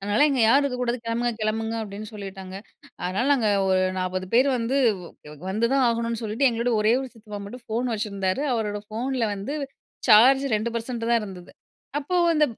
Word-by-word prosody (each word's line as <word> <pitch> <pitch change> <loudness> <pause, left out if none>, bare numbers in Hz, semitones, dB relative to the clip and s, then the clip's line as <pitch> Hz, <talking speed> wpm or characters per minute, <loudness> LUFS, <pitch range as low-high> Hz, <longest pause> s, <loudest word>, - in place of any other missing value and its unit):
"அதனால 205 +7 +2
இங்க 265 -3 +1
யாரும் 270 +6 +5
இருக்க 255 -3 -2
கூடாது, 245 0 0
கிளம்புங்க 235 +1 0
கிளம்புங்க" 220 +1 -1
அப்படின்னு 210 +1 -7
சொல்லிட்டாங்க. 195 -2 -8 0.5
அதனால 190 +7 0
நாங்க 235 -6 +2 0.2
ஒரு 185 0 +3 0.2
40 185 0 -2
பேர் 255 +4 +5
வ் - - +1
வந்து 240 +4 0 0.7
வந்து 220 +4 +1
தான் 270 -1 +3
ஆகணுனு 230 -1 -1
சொல்லிட்டு, 225 +5 +2
எங்களோட 235 +1 -1
ஒரே 215 +1 +3
ஒரு 265 - -5
சித்தப்பா 210 -2 -9
மட்டும் 245 +4 -10
ஃபோன் 235 +3 -1
வச்சிருந்தாரு, 200 0 -2
அவரோட 210 -3 -2
ஃபோன்ல 245 +3 -2
வந்து 200 +9 -5 0.5
சார்ஜ் 255 +5 +7
2% 230 +2 -2
தான் 235 -1 +4
இருந்தது. 185 -4 -9 0.5
அப்போ 330 +6 -2 0.2
அந்த 305 -1 +4
230 Hz, 170 wpm, -25 LUFS, 205-245 Hz, 0.7 s, சார்ஜ்